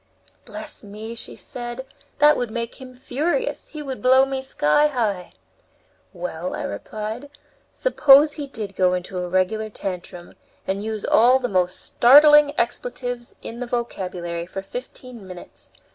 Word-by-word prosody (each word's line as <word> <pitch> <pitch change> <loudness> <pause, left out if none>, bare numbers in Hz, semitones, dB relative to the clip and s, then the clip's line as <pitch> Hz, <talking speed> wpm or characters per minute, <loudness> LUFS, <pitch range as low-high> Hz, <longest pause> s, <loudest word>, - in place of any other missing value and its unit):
"Bless - - -8
me!" 215 +2 -8
she 235 - -7
said, 240 +1 -6 0.3
"that 300 +1 +6
would 245 -2 -2
make 235 +3 -5
him 255 -1 -11
furious; 310 - -2
he 305 -2 -8
would 265 -2 -6
blow 260 +1 +5
me 270 -1 -3
sky 265 - +2
high." 215 -10 -2 0.8
"Well," 180 -1 -5
I - - -4
replied, 215 +6 -6 0.4
"suppose 295 - +5
he 290 -3 -6
did 215 -7 -6
go 180 -1 +3
into 180 +1 -5
a 180 0 -4
regular 215 +4 0
tantrum 180 -3 -7 0.3
and 195 +2 -2
use 220 -1 -4
all 245 +3 +5
the 255 -1 -2
most 180 -3 +1
startling 295 +3 +6
expletives 245 0 -3
in 235 - -7
the 250 - -4
vocabulary 180 -8 -4
for 195 +1 -6
fifteen 245 0 -9
minutes! 180 -1 -10
235 Hz, 145 wpm, -22 LUFS, 190-265 Hz, 0.8 s, that